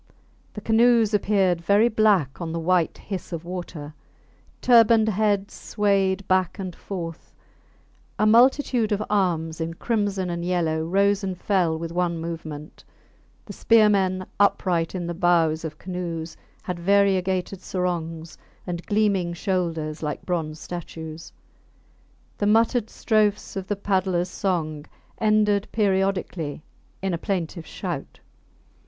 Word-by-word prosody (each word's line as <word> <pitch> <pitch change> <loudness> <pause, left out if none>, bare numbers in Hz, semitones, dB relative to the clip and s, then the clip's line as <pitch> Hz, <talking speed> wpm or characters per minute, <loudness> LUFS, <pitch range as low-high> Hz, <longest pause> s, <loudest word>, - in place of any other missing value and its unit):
The 210 - -6
canoes 225 0 +4
appeared 195 -4 +2
very 205 +6 +4
black 205 - +2
on 165 -1 -3
the 165 - -2
white 175 0 +1
hiss 190 -3 -7
of 170 -1 -5
water; 175 -4 -6 0.7
turbaned 230 -2 +5
heads 205 -1 0
swayed 195 -2 0
back 185 -1 +1
and 185 -3 -5
forth; 170 -4 -7 0.8
a 215 - +2
multitude 240 0 +4
of 205 0 0
arms 165 -5 0
in 165 +1 -3
crimson 200 -4 -1
and 170 0 -3
yellow 165 -3 0
rose 200 +4 +2
and 190 -2 -3
fell 180 -5 +1
with 165 0 -5
one 175 -1 0
movement; 160 -2 -7 0.6
the - - -8
spearmen 200 -4 +3
upright 180 -4 +2
in 175 -2 -3
the 170 - -3
bows 165 -2 +2
of 155 -2 -6
canoes 170 -3 -5 0.3
had 180 -2 -4
variegated 190 0 +1
sarongs 165 -3 -4 0.3
and 175 -1 -4
gleaming 200 -5 +1
shoulders 170 -4 -2
like 150 -2 -4
bronze 160 -4 -2
statues; 165 -2 -8 1.1
the 205 - +1
muttered 225 +1 +3
strophes 215 -2 0
of 190 -1 -4
the 205 - -1
paddlers 185 -3 0
song 155 -7 -2 0.3
ended 210 -1 +2
periodically 190 -7 -1 0.4
in 190 -2 0
a 170 - -2
plaintive 170 -3 -3
shout. - - -6
185 Hz, 125 wpm, -24 LUFS, 170-205 Hz, 1.1 s, turbaned